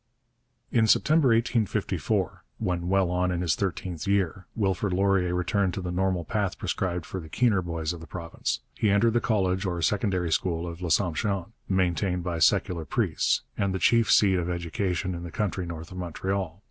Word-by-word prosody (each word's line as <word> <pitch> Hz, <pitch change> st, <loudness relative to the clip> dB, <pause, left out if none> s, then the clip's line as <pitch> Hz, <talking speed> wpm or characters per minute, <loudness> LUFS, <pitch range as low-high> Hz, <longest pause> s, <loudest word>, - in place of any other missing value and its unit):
In 110 Hz, -2 st, +3 dB
September 155 Hz, +5 st, +4 dB
1854, 115 Hz, -2 st, 0 dB
when 90 Hz, -1 st, -2 dB
well 95 Hz, -2 st, +2 dB
on 90 Hz, 0 st, +1 dB
in 90 Hz, -1 st, -1 dB
his 85 Hz, -4 st, +2 dB
thirteenth 90 Hz, -3 st, -3 dB
year, 95 Hz, -2 st, 0 dB
Wilfrid 95 Hz, -2 st, 0 dB
Laurier 95 Hz, -2 st, +2 dB
returned 95 Hz, +1 st, 0 dB
to 95 Hz, -, -3 dB
the 90 Hz, -1 st, -4 dB
normal 90 Hz, -1 st, 0 dB
path 100 Hz, +2 st, -1 dB
prescribed 90 Hz, -3 st, -2 dB
for 95 Hz, -, -5 dB
the 80 Hz, -3 st, -10 dB
keener 110 Hz, -1 st, +2 dB
boys 85 Hz, -1 st, -3 dB
of 85 Hz, -, -8 dB
the 80 Hz, -, -10 dB
province. 85 Hz, -1 st, -4 dB
He 110 Hz, -, +1 dB
entered 105 Hz, +3 st, +3 dB
the 120 Hz, -, +2 dB
college 95 Hz, -4 st, +1 dB
or 90 Hz, -3 st, -2 dB
secondary 95 Hz, -3 st, +1 dB
school 85 Hz, 0 st, 0 dB
of 85 Hz, 0 st, -7 dB
L'Assomption, 90 Hz, +3 st, 0 dB, 0.2 s
maintained 90 Hz, -1 st, +1 dB
by 85 Hz, -2 st, -2 dB
secular 85 Hz, +2 st, +2 dB
priests, 75 Hz, -, 0 dB
and 95 Hz, -1 st, 0 dB
the -, -, +1 dB
chief 115 Hz, +3 st, +3 dB
seat 95 Hz, -3 st, +5 dB
of 85 Hz, 0 st, -2 dB
education 90 Hz, +1 st, -2 dB
in 85 Hz, -, -5 dB
the 85 Hz, -, -6 dB
country 95 Hz, -1 st, -2 dB
north 80 Hz, 0 st, -7 dB
of 95 Hz, -, -7 dB
Montreal. 90 Hz, 0 st, -3 dB
90 Hz, 180 wpm, -27 LUFS, 85-100 Hz, 0.2 s, seat